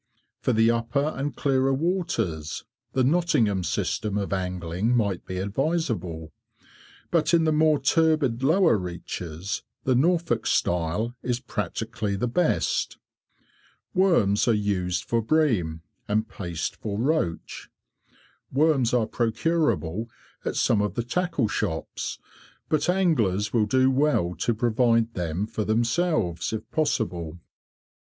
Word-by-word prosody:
For - - 0
the 115 0 +4
upper 140 +6 0
and 140 -1 -3
clearer 135 -1 +2
waters, 130 - -2 0.3
the 130 - +2
Nottingham 125 - +2
system 105 +5 -1
of 100 -1 -2
angling 90 +4 -1
might 100 -5 -1
be 95 - -4
advisable, 100 - -2 0.8
but 170 0 +3
in 165 - +3
the 160 - +2
more 155 0 +4
turbid 145 -4 +2
lower 160 - +4
reaches 90 +1 -5 0.2
the 130 - +2
Norfolk 160 -3 +1
style 90 +7 0
is 125 -1 -1
practically 110 -2 -3
the 125 +5 -1
best. 175 +9 0 1.0
Worms 170 - +3
are 115 - +4
used 95 -4 -1
for 115 -1 0
bream, 110 - +1 0.2
and 110 +2 0
paste 85 -4 -4
for 100 -2 -4
roach. 125 - -1 0.8
Worms 135 -4 +3
are 120 -3 +2
procurable 115 - 0 0.4
at - - -2
some 105 - +2
of 105 - -2
the 120 - -1
tackle 145 -2 0
shops, - - -3 0.5
but 155 +2 +1
anglers 120 - +1
will 110 -3 +3
do 130 +4 +3
well 130 -11 +2
to 120 - 0
provide 115 0 +2
them 90 +2 -2
for 110 0 -3
themselves 115 - 0
if 110 -1 -4
possible. 90 - -1
115 Hz, 125 wpm, -25 LUFS, 100-145 Hz, 1.0 s, the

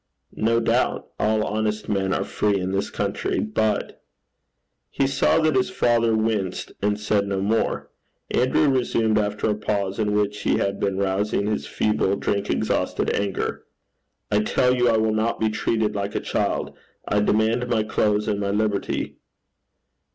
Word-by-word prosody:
'No 115 +1 +1
doubt. 115 - 0
All 110 0 +2
honest 105 0 -2
men 95 -2 0
are - - 0
free 100 -2 0
in 95 0 -2
this 95 +1 -1
country. - - -2
But 105 +9 -1 0.4
' - - -53
He 135 - 0
saw 135 0 +2
that 155 -1 +2
his 195 0 +2
father 115 -10 +2
winced, 110 -4 -1
and 105 +1 0
said 105 -1 +1
no 100 -1 -1
more. 105 +4 -1 0.4
Andrew 130 +4 +3
resumed, 115 -5 +2
after 105 0 -1
a 105 - +2
pause 100 -1 -2
in 105 -1 +1
which 105 0 0
he - - +1
had 100 0 -1
been 100 -1 -1
rousing 100 +1 0
his 105 0 -2
feeble 105 -2 +1
drink 100 0 -2
exhausted - - 0
anger, 100 -2 -2 0.7
'I 105 - +3
tell 125 +2 +2
you 125 -1 +3
I 115 - +3
will 110 0 +1
not 110 +2 0
be 110 - +2
treated 110 0 0
like 100 0 -3
a - - +1
child. - - -2 0.3
I 105 - +2
demand 110 +4 +2
my 115 -3 +1
clothes 105 -1 +1
and 100 - 0
my 100 -1 -1
liberty.' 105 0 -1
105 Hz, 165 wpm, -23 LUFS, 100-110 Hz, 0.7 s, Andrew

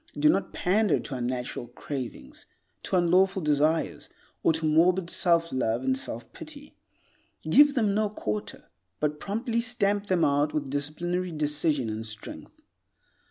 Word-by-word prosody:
Do 150 +1 +4
not 195 - +1
pander 205 +4 +2
to - - -7
unnatural 125 -1 -3
cravings, 120 - -7 0.3
to - - -2
unlawful 185 +2 +3
desires, 150 +2 +1 0.3
or - - +4
to 160 0 -1
morbid 170 +3 +3
self 170 -1 +2
love 120 -1 0
and 130 0 +1
self 120 -2 -7
pity. 295 -1 -11 0.7
Give 290 0 +6
them 215 -6 +2
no 215 0 +1
quarter, 105 - -5 0.3
but 150 0 -1
promptly 230 +3 -2
stamp 205 -4 0
them 180 -4 +2
out 145 +1 +1
with 140 -3 -2
disciplinary 175 +5 -2
decision 150 -3 0
and 110 0 -4
strength. 110 -1 -8
160 Hz, 140 wpm, -27 LUFS, 140-195 Hz, 0.7 s, Give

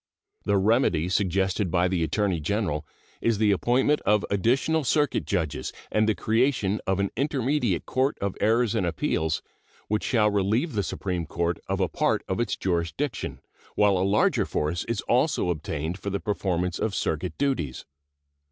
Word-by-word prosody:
The 100 -1 +2
remedy 95 - +2
suggested 95 0 +1
by 90 +1 +2
the 90 -2 0
Attorney 90 +2 0
General 80 -3 -1 0.3
is 115 -2 +2
the 105 -1 +3
appointment 125 +8 +2
of 105 0 +2
additional 130 +10 +2
circuit 145 +2 +1
judges 80 -9 -2 0.2
and 110 0 +2
the 110 - +2
creation 115 -3 +1
of 95 0 +1
an 100 0 0
intermediate 135 - 0
court 130 +2 0
of 100 -1 -2
errors 115 +1 +3
and 110 - 0
appeals, 80 -2 -1 0.5
which 105 0 0
shall 105 -4 +2
relieve 105 - +1
the 105 - +1
Supreme 90 -3 -3
Court 85 0 -1
of - - -1
a - - +2
part - - 0
of 95 - -2
its 120 -3 0
jurisdiction, 90 - -2 0.3
while 105 -2 +4
a - - +1
larger 100 +3 +2
force 80 +4 -1
is 115 - -2
also 125 - +1
obtained 80 +2 -4
for 100 - -4
the 100 0 -2
performance 90 -4 -1
of 110 -3 -1
circuit 85 +3 -2
duties. 130 - -1
100 Hz, 160 wpm, -26 LUFS, 90-115 Hz, 0.5 s, while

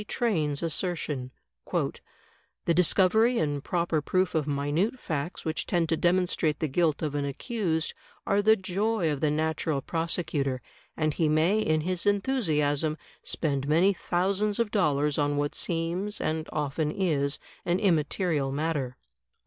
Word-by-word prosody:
Train's 160 - 0
assertion: 155 -6 -2 0.4
"The 170 - -4
dis 175 0 +3
covery 220 +6 +4
and 145 -2 -1
proper 170 -3 0
proof 185 +4 +1
of 155 -2 0
minute 145 - 0
facts 160 - -4
which 160 -1 -2
tend 170 -2 +1
to 165 - +3
demonstrate 175 -3 +1
the 155 - 0
guilt 155 +2 +1
of 150 -2 -1
an 145 -1 -1
accused 160 - -1 0.3
are 200 +1 +2
the 220 +2 +6
joy 195 -2 0
of 140 -2 -3
the 155 - +3
natural 155 -1 0
prosecutor, 160 -4 -2 0.4
and 155 -1 +1
he 160 0 +1
may 160 +7 +3
in 155 -6 +1
his 180 +3 -2
enthusiasm 160 - +1 0.2
spend 140 -3 -1
many 170 +7 +4
thousands 195 +4 0
of 230 -3 0
dollars 150 -7 +2
on 145 0 +1
what 145 0 0
seems, 175 +5 -1
and 155 0 -2
often 150 0 -1
is, 150 -6 0 0.3
an 175 +1 +1
im 195 -3 +3
material 155 -3 0
matter." 145 -4 -2
160 Hz, 150 wpm, -28 LUFS, 150-185 Hz, 0.4 s, the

